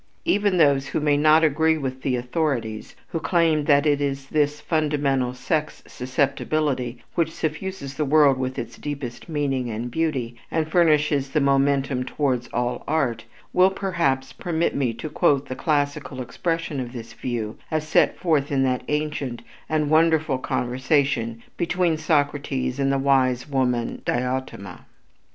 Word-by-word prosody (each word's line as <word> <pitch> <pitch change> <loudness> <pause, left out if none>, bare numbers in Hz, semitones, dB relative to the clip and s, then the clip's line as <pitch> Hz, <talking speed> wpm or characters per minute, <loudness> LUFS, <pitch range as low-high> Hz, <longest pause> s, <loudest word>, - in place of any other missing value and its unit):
Even 205 -2 +2
those 140 -4 +4
who - - -1
may 150 -1 +2
not 155 +2 +5
agree 160 +1 +3
with 130 -3 -4
the 130 -1 0
authorities 125 -4 -2
who 165 - -2
claim 160 -1 +2
that 145 -1 +4
it 145 -1 +2
is 140 -1 -2
this 150 -1 +1
fundamental 145 -5 0
sex 155 +4 -2
susceptibility 130 -1 -1
which 165 -2 0
suffuses 160 -1 -4
the 150 - -1
world 145 -2 +4
with 130 0 -3
its 115 - -6
deepest 140 -2 -6
meaning 135 -5 -1
and 115 +2 -4
beauty, 135 -6 -1
and 160 -1 0
furnishes 150 -5 +3
the 145 - +1
momentum 140 -1 +2
towards 130 -2 -1
all 120 0 -2
art, 125 -8 0 0.3
will 185 +1 +5
perhaps 170 -9 -1
permit 170 -1 -1
me 130 -4 0
to 115 +7 -6
quote 140 -2 +2
the 130 - -5
classical 145 -2 -1
expression 160 +3 -2
of 125 -1 -5
this 115 -2 -8
view 115 -2 -4
as 155 -1 -2
set - - +3
forth 150 -5 +1
in 135 -1 +2
that 130 -1 +1
ancient 150 -5 -2 0.3
and 155 -1 0
wonderful 160 -4 +3
conversation 125 -2 0
between 175 -1 +1
Socrates 145 -4 0
and 135 0 +2
the 135 - +2
wise 130 -2 +2
woman 125 -4 -1
Diotima. 125 -6 -3
140 Hz, 150 wpm, -23 LUFS, 130-155 Hz, 0.3 s, not